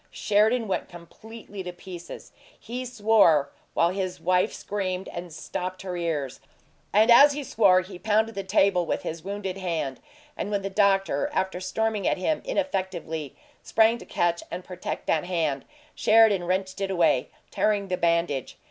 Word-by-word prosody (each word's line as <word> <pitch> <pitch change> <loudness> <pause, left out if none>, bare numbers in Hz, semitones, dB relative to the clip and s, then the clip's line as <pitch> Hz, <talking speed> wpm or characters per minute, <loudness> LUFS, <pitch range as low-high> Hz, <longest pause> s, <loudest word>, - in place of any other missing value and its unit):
Sheridan 220 +3 +2
went 195 - -2
completely 205 +4 -11
to 180 -1 -5
pieces: 175 -1 -10 0.3
he 250 +3 -6
swore, 205 - +3 0.2
while 170 +1 +3
his 185 -1 -3
wife 180 +2 +2
screamed 190 -2 -4
and 175 0 -7
stopped 185 +4 -5
her 185 -2 -4
ears. 160 -6 -3 0.5
And 215 +4 +5
as 285 +5 +8
he 290 0 -4
swore 195 -7 +4
he 185 0 -10
pounded 220 +2 +1
the 195 - -4
table 190 -2 +2
with - - -2
his 160 0 -5
wounded 195 -1 -4
hand, 165 -8 -3 0.4
and - - -4
when 200 -2 -1
the 195 - -4
doctor, 200 +6 +2
after 190 -1 -1
storming 210 +2 -1
at - - +1
him 295 +12 -1
ineffectively, 185 - -3 0.3
sprang 225 +1 +3
to - - -11
catch 170 0 0
and 180 +2 -6
protect 180 -1 -6
that 160 +1 +1
hand, 160 -6 -1 0.3
Sheridan 215 -5 +4
wrenched 190 +2 -2
it 195 - -1
away, 165 -8 +2 0.2
tearing 205 -2 0
the 180 - +1
bandage. 170 -6 0
190 Hz, 160 wpm, -26 LUFS, 175-210 Hz, 0.5 s, as